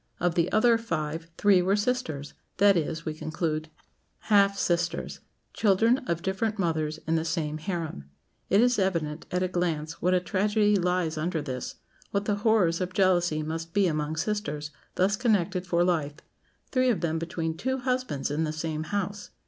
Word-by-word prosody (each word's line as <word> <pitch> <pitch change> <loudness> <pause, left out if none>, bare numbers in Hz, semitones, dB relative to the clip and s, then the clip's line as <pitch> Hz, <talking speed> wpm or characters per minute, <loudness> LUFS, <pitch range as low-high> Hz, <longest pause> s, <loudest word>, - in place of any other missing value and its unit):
Of 175 0 +1
the 170 +1 +1
other 230 +1 +4
five 165 -6 -3
three 200 -3 +5
were 190 +3 +2
sisters 205 - -2 0.2
that 200 0 +6
is, 165 0 -2
we 155 - -2
conclude, 155 0 -3 0.6
half 200 -1 +5
sisters; 175 -2 -1 0.3
children 225 +5 +3
of 170 0 -1
different 210 +3 -1
mothers 155 -4 -1
in 160 - 0
the 160 - 0
same 155 -2 -2
harem. 165 - -4 0.4
It 200 - +5
is 245 -2 +3
evident, 165 -5 -1
at 180 +1 0
a - - +1
glance, 170 -3 -2
what 180 +1 +3
a - - +4
tragedy 205 +3 +2
lies 180 -4 0
under 165 +1 -1
this; 130 -4 -5 0.3
what 200 0 -1
the 205 -1 0
horrors 205 -6 +2
of 185 0 -3
jealousy 175 -5 +2
must 165 +2 -5
be 200 -1 +4
among 155 -2 -1
sisters 160 -5 -2 0.2
thus 195 +3 +2
connected 200 -6 +1
for 175 -1 +2
life; 155 -5 0 0.6
three 255 -1 +3
of 205 -9 +1
them 165 -1 0
between 165 -1 -3
two 260 +9 -1
husbands 255 - -2
in 150 +2 0
the 155 - -1
same 155 0 -3
house! 205 +1 -3
175 Hz, 170 wpm, -27 LUFS, 160-205 Hz, 0.6 s, that